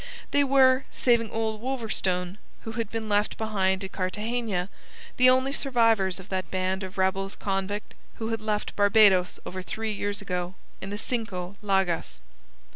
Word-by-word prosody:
They 285 - +4
were 265 -1 +5
saving 235 -3 +2
old 220 -1 -2
Wolverstone, 205 -7 -2 0.2
who 225 - -6
had 225 -2 -3
been 225 -1 -4
left 205 0 +1
behind 195 -3 0
at 190 - -6
Cartagena 210 0 -2 0.5
the 255 0 +7
only 260 +2 +3
survivors 230 -9 +2
of 190 - -12
that 185 -2 -2
band 185 +1 -1
of 190 +1 -7
rebels 190 +1 0
convict 195 +1 -3 0.2
who 225 0 -4
had 225 -1 -2
left 210 -1 -2
Barbados 205 -3 +5
over 185 0 -5
three 220 +4 -3
years 205 0 -2
ago 180 -2 -3 0.3
in 195 - -5
the 205 - -4
Cinco 200 -6 -3
Llagas. 190 -4 0
205 Hz, 155 wpm, -27 LUFS, 190-225 Hz, 0.5 s, the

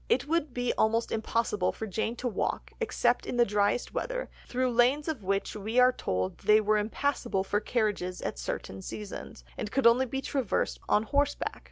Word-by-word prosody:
It 255 +2 +2
would 315 -2 0
be 245 0 -1
almost 225 +2 +2
certainly - - -1
impossible 210 -5 +1
for 220 - -6
Jane 220 +3 -2
to 245 - -3
walk, 220 - -2
except 250 - +1
in 245 - -2
the 240 - +6
driest 205 +3 +1
weather, - - -3 0.2
through 255 0 0
lanes 250 +6 +3
of 295 -10 -3
which 195 +2 -1
we 215 +3 -3
are 250 0 +7
told 95 - -2
they 215 0 +5
were 215 0 +2
impassable 225 -2 -1
for 205 +1 0
carriages 210 -5 -1
at - - -4
certain 95 +9 -4
seasons, 105 - -7 0.2
and 210 - -3
could 270 -1 0
only 245 +3 +6
be 270 +3 -3
traversed 265 -7 -1
on 210 - +4
horseback. 285 +5 0
230 Hz, 190 wpm, -29 LUFS, 205-255 Hz, 0.2 s, are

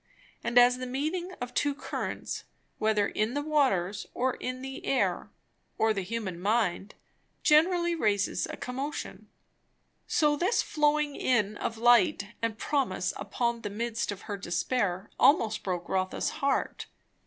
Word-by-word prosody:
And 235 +1 0
as 245 +1 +7
the 255 - -4
meeting 315 +8 -2
of 245 0 -5
two 290 -1 +1
currents, - - -4 0.3
whether 215 -2 +2
in 220 +5 -1
the 290 - -1
waters 210 - +1
or 255 +1 +1
in 255 +1 -5
the 270 0 -7
air 270 - 0 0.5
or 220 0 +3
the 200 - -2
human 190 -3 -4
mind, 205 -1 0 0.5
generally 345 +3 +4
raises 210 - +1
a - - -7
commotion, 270 +4 -5 0.8
so 300 -2 +3
this 360 +10 +1
flowing 300 -1 +1
in 215 -5 +1
of 225 +2 -3
light 225 -4 +4
and 230 -1 -1
promise 230 -10 0
upon 235 +3 -2
the 205 - -4
midst 225 +1 -2
of 200 - -7
her 205 -2 -5
despair 190 +1 -1
almost 225 -7 +4
broke 180 -2 -3
Rotha's 185 0 -1
heart. 275 0 -1
235 Hz, 140 wpm, -29 LUFS, 205-280 Hz, 0.8 s, as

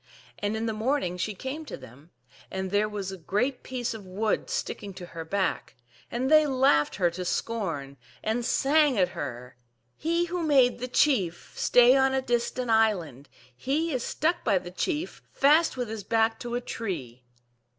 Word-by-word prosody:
And 205 +2 -1
in 225 - -2
the 225 - -1
morning 220 -4 0
she 200 +3 -3
came 265 +9 -5
to - - -7
them,/ 130 +5 -15 0.4
and 190 -1 -4
there 210 +1 +2
was 200 -2 -4
a 190 - -7
great 245 - -1
piece 250 -3 -3
of 220 -2 -8
wood 200 +4 -1
sticking 200 -2 -4
to 180 - -8
her 165 -1 -7
back, 190 +3 -2 0.3
and 255 +4 -1
they 310 -1 +6
laughed 255 - +3
her 175 -3 +2
to 180 +2 -5
scorn, 175 -8 -3 0.3
and 225 +3 0
sang 285 +1 +3
at 180 -2 +3
her, 125 -5 -6 0.4
"He 335 +2 0
who 350 +1 -3
made 270 -7 +4
the 250 - -3
chief 215 - +1
Stay 245 +1 +5
on 265 0 +3
a 265 - +1
distant 240 0 -1
island, 175 - +1 0.3
He 300 - -1
is 255 - -1
stuck 325 +4 0
by 200 -4 +3
the 175 -1 -6
chief 315 - -3
Fast 300 +1 +4
with 245 -1 -2
his 220 -1 -6
back 225 +2 +1
to 240 -1 -4
a 245 - -1
tree." 155 - -5
225 Hz, 180 wpm, -27 LUFS, 185-265 Hz, 0.4 s, they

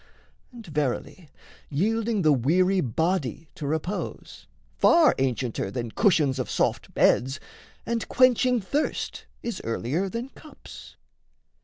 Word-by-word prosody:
And, 235 -3 -11
verily, 145 +1 -3 0.4
Yielding 215 +6 0
the 155 -1 +5
weary 180 +9 +2
body 160 - -1
to 145 - -6
repose, 160 +7 -4 0.3
Far 335 -4 +6
ancienter 125 -6 -1
than 120 +1 -4
cushions 145 - +2
of 125 - -3
soft - - -1
beds, 135 +3 +3 0.5
And 230 -1 -2
quenching 250 -1 +3
thirst 285 +11 -3 0.2
is 235 - -4
earlier 135 +11 -2
than 235 +5 -5
cups. 305 - -13
165 Hz, 115 wpm, -26 LUFS, 135-225 Hz, 0.5 s, Far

